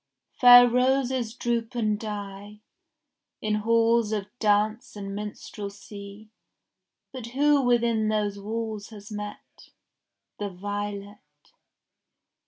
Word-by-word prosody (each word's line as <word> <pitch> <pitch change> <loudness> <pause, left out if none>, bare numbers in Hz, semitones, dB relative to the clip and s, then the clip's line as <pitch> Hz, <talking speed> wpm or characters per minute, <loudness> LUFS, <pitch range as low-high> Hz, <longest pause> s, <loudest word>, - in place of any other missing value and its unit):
Fair 245 -1 +9
roses 250 -1 +1
droop 235 0 -2
and 215 -3 0
die 205 -1 -7 0.8
In 215 0 -1
halls 230 +1 +2
of 205 -2 -2
dance 215 +1 +1
and 195 -1 -6
minstrelsy; 205 0 -8 0.8
But 250 -3 -7
who 285 +3 +3
within 235 -3 +2
those 205 -2 -1
walls 220 0 -4
has 210 -1 -12
met 210 0 -8 0.7
The 205 -1 -2
violet? 205 +2 -5
215 Hz, 95 wpm, -26 LUFS, 205-235 Hz, 0.8 s, Fair